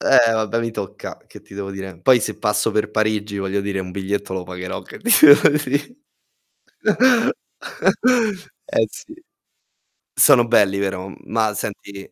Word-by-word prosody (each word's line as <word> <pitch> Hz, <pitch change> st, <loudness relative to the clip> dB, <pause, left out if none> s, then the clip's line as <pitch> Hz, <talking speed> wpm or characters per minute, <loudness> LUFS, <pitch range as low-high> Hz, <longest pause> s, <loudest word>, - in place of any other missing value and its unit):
Eh, 115 Hz, -1 st, +4 dB
vabbè, 110 Hz, +1 st, -1 dB
mi 115 Hz, 0 st, -3 dB
tocca, 100 Hz, -4 st, -7 dB
che -, -, -15 dB
ti -, -, -16 dB
devo 100 Hz, -1 st, -6 dB
dire? 95 Hz, -3 st, -8 dB
Poi 125 Hz, +3 st, +4 dB
se -, -, -4 dB
passo 105 Hz, 0 st, 0 dB
per 105 Hz, 0 st, -1 dB
Parigi, 105 Hz, -1 st, -1 dB
voglio 100 Hz, +1 st, -2 dB
dire 100 Hz, -1 st, -3 dB
un 90 Hz, -1 st, -7 dB
biglietto 100 Hz, +1 st, -4 dB
lo 95 Hz, -1 st, -4 dB
pagherò, 90 Hz, +1 st, -7 dB
che -, -, -12 dB
ti 240 Hz, +3 st, -2 dB, 0.2 s
devo 145 Hz, -1 st, +7 dB
dì 145 Hz, -, -2 dB, 2.7 s
eh, 110 Hz, -, 0 dB
sì. 320 Hz, +3 st, -13 dB, 0.9 s
Sono 125 Hz, -5 st, +5 dB
belli, 100 Hz, -4 st, +2 dB
vero? 95 Hz, -1 st, -4 dB
Ma 110 Hz, -1 st, -1 dB
senti 100 Hz, -1 st, -8 dB
105 Hz, 150 wpm, -20 LUFS, 95-115 Hz, 2.7 s, devo